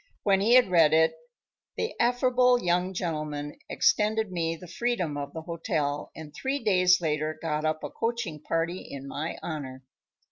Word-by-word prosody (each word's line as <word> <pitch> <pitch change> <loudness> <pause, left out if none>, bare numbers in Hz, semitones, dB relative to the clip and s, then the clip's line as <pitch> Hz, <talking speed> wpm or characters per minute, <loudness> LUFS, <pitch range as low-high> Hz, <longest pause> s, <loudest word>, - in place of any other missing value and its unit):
When 195 -2 +3
he 230 +5 +5
had 250 -7 +5
read 160 -3 +5
it 160 0 +4 0.6
the 450 - -2
affable 250 0 +3
young 180 -1 +1
gentleman 150 -5 -4
extended 215 -1 +2
me 165 -2 -1
the 180 +2 -12
freedom 185 -7 -1
of 140 0 -5
the 160 - -6
hotel 155 -4 -2
and 155 -2 -10
three 265 - -2
days 180 -6 +3
later 155 -1 -1
got 155 -1 -2
up 155 0 -1
a - - -5
coaching 225 -10 -3
party 165 +3 -1
in 140 0 -9
my 155 +4 -4
honor. 135 -5 -6
170 Hz, 165 wpm, -27 LUFS, 155-210 Hz, 0.6 s, he